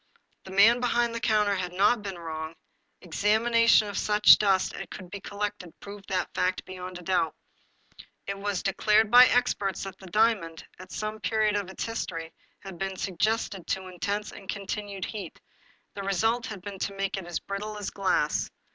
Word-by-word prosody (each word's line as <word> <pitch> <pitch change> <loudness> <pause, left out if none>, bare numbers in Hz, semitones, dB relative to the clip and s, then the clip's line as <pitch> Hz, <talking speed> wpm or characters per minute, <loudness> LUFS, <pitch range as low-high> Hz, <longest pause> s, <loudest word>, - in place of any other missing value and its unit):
The - - -10
man 215 +5 +6
behind 240 -1 +1
the 230 - -3
counter 215 -3 +2
had 180 -2 -3
not 210 +5 +3
been 195 -3 -6
wrong; 160 -1 -6 0.5
examination 220 +5 +3
of 205 - -3
such 210 0 +6
dust 195 -3 +2
as - - -6
could 185 -1 -10
be 200 - -6
collected 200 -4 -5
proved 200 -1 -10
that 185 -1 -1
fact 185 0 0
beyond 185 -1 -7
a 180 - -11
doubt. 170 -3 0 0.9
It 195 - -3
was 200 -2 -2
de 195 - 0
clared 215 0 +3
by 250 +1 +10
experts 225 -6 +1
that 195 -1 -8
the 190 - -12
diamond, 200 -5 +1
at 185 - -11
some 215 0 -4
period 215 -2 +1
of 200 -2 -2
its 190 - -5
history, 165 -8 -5 0.3
had 190 -3 -9
been 195 -1 -3
subjected 195 0 -1
to 190 -1 -2
intense 200 +4 -3
and 195 - -13
continuing 200 -1 -4
heat. 200 -7 -6 0.5
The 200 - -6
result 225 +6 0
had 200 -6 -8
been 200 -1 -7
to 200 - -3
make 195 0 -2
it 190 -3 -6
as 175 -2 -2
brittle 210 +2 -5
as 205 - -4
glass. 190 -6 0
200 Hz, 180 wpm, -27 LUFS, 185-215 Hz, 0.9 s, by